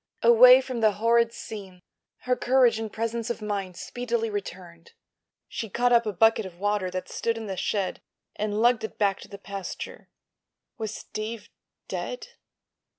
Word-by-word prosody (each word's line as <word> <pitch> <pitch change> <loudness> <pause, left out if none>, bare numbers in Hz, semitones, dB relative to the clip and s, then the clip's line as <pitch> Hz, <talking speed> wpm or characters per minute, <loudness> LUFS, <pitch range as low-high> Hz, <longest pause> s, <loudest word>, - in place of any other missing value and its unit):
Away 250 +2 +8
from 255 -2 -5
the 215 -2 +4
horrid 230 +2 +3
scene 195 -6 -9 0.4
her 250 0 +1
courage 250 -3 +3
and 220 -1 -4
presence 230 +1 -3
of 235 - -3
mind 200 -4 -4
speedily 235 -2 -2
returned. 180 -4 -7 0.5
She 225 - -5
caught 245 +4 +2
up 235 -1 +4
a - - 0
bucket 225 +3 +3
of 185 -3 -10
water 205 -2 0
that 185 0 -5
stood 230 0 -2
in 225 - -6
the 195 -2 -4
shed 195 0 -2 0.3
and 210 0 -2
lugged 240 -2 +4
it 220 - -6
back 200 -2 +1
to - - -11
the 200 - -10
pasture. 195 -2 -7 0.7
Was 220 -1 -3
Steve 215 0 -6 0.4
dead? - - -5
220 Hz, 160 wpm, -26 LUFS, 200-235 Hz, 0.7 s, Away